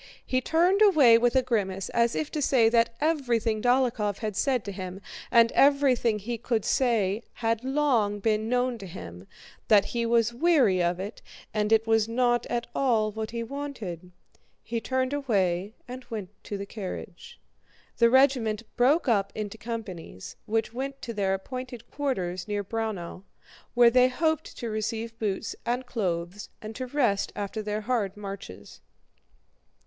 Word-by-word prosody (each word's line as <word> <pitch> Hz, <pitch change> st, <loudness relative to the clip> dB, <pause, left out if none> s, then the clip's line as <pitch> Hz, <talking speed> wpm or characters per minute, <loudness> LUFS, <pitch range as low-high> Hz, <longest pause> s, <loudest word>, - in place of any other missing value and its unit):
He 255 Hz, 0 st, 0 dB
turned 350 Hz, -, +2 dB
away 285 Hz, -, +7 dB
with 245 Hz, +2 st, +2 dB
a 260 Hz, -, +4 dB
grimace 195 Hz, -6 st, -1 dB
as 235 Hz, 0 st, +1 dB
if 305 Hz, -, -2 dB
to 305 Hz, -, -2 dB
say 245 Hz, -5 st, +4 dB
that 230 Hz, 0 st, +2 dB
everything 240 Hz, -8 st, 0 dB
Dólokhov 245 Hz, -5 st, +1 dB
had 215 Hz, -3 st, -4 dB
said 255 Hz, +1 st, 0 dB
to 200 Hz, -, -4 dB
him 185 Hz, -1 st, -6 dB, 0.3 s
and 230 Hz, -1 st, +5 dB
everything 270 Hz, -5 st, +3 dB
he 230 Hz, +3 st, -5 dB
could 230 Hz, -2 st, -1 dB
say 220 Hz, -5 st, +1 dB
had 230 Hz, 0 st, -1 dB
long 260 Hz, -7 st, +1 dB
been 215 Hz, +1 st, 0 dB
known 250 Hz, -1 st, 0 dB
to 195 Hz, -, -8 dB
him, 90 Hz, -, -10 dB, 0.4 s
that 205 Hz, -3 st, +5 dB
he 235 Hz, -1 st, -2 dB
was 230 Hz, 0 st, +2 dB
weary 245 Hz, -, +3 dB
of 175 Hz, +1 st, 0 dB
it 200 Hz, +4 st, -6 dB, 0.3 s
and 210 Hz, 0 st, 0 dB
it 225 Hz, 0 st, +4 dB
was 225 Hz, -1 st, +2 dB
not 240 Hz, 0 st, +1 dB
at 240 Hz, 0 st, -2 dB
all 225 Hz, -5 st, +1 dB
what 220 Hz, +1 st, -4 dB
he 235 Hz, 0 st, -4 dB
wanted. 230 Hz, -, -6 dB, 0.5 s
He 230 Hz, 0 st, -3 dB
turned 260 Hz, +2 st, -1 dB
away 200 Hz, -7 st, 0 dB
and 255 Hz, +1 st, -8 dB
went 210 Hz, -6 st, -5 dB, 0.2 s
to 205 Hz, -, -4 dB
the 200 Hz, -, -5 dB
carriage. 200 Hz, -, -8 dB, 0.6 s
The 235 Hz, 0 st, +5 dB
regiment 245 Hz, -4 st, +3 dB
broke 275 Hz, +6 st, +3 dB
up 200 Hz, -5 st, +2 dB
into 215 Hz, 0 st, -5 dB
companies, 205 Hz, -, -7 dB
which 225 Hz, +1 st, -1 dB
went 270 Hz, +2 st, -4 dB
to 235 Hz, -, -4 dB
their 195 Hz, -2 st, 0 dB
appointed 245 Hz, +3 st, -8 dB
quarters 185 Hz, -10 st, -2 dB
near 205 Hz, -1 st, -2 dB
Braunau, 205 Hz, -5 st, -4 dB, 0.5 s
where 240 Hz, -1 st, +7 dB
they 250 Hz, +1 st, +5 dB
hoped 315 Hz, +4 st, -1 dB
to 235 Hz, -2 st, -4 dB
receive 225 Hz, +1 st, -3 dB
boots 205 Hz, -3 st, -2 dB
and 245 Hz, +2 st, -2 dB
clothes 185 Hz, -5 st, -3 dB
and 215 Hz, 0 st, -8 dB
to 255 Hz, 0 st, -4 dB
rest 245 Hz, -7 st, +1 dB
after 205 Hz, +2 st, -4 dB
their 210 Hz, 0 st, -3 dB
hard 210 Hz, -4 st, -1 dB
marches. 195 Hz, -, -9 dB
230 Hz, 160 wpm, -27 LUFS, 205-255 Hz, 0.6 s, away